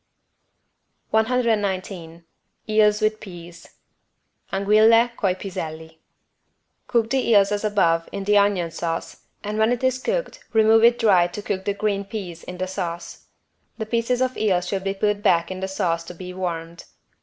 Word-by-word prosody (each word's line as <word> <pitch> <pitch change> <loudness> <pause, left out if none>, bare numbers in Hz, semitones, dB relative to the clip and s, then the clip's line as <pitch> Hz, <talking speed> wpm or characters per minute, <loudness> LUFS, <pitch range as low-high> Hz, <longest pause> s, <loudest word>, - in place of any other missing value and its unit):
119 200 -7 -1 0.4
EELS 215 0 +3
WITH 215 0 +1
PEAS 175 -3 -11 0.8
(Anguille 215 +4 +4
coi 190 -5 0
piselli) 160 -4 -7 0.9
Cook 230 -2 +1
the 265 -2 +1
eels 200 -3 +5
as 205 0 -1
above 170 -6 +1
with 200 -1 -5
the 210 +1 +3
onion 200 -5 +2
sauce 165 0 -4 0.3
and 210 +1 -3
when 220 +2 +3
it 245 +1 -2
is 260 0 +1
cooked - - -3
remove 220 0 +5
it 235 +1 +6
dry 190 -7 +4
to 205 +4 -8
cook 190 -2 -3
the 200 - -1
green 200 -1 -1
peas 190 -5 -7
in 180 - -8
the 185 - -2
sauce. 175 -2 -6 0.5
The 220 - -4
pieces 235 +3 0
of 255 0 -2
eel 190 -5 +2
should 190 +2 -3
be 195 0 -1
put 205 +1 0
back 170 -2 +2
in 185 - -5
the 190 - -3
sauce 170 -3 -1
to 175 - -9
be 180 +1 -8
warmed. 170 -2 -5
200 Hz, 160 wpm, -23 LUFS, 175-220 Hz, 0.9 s, it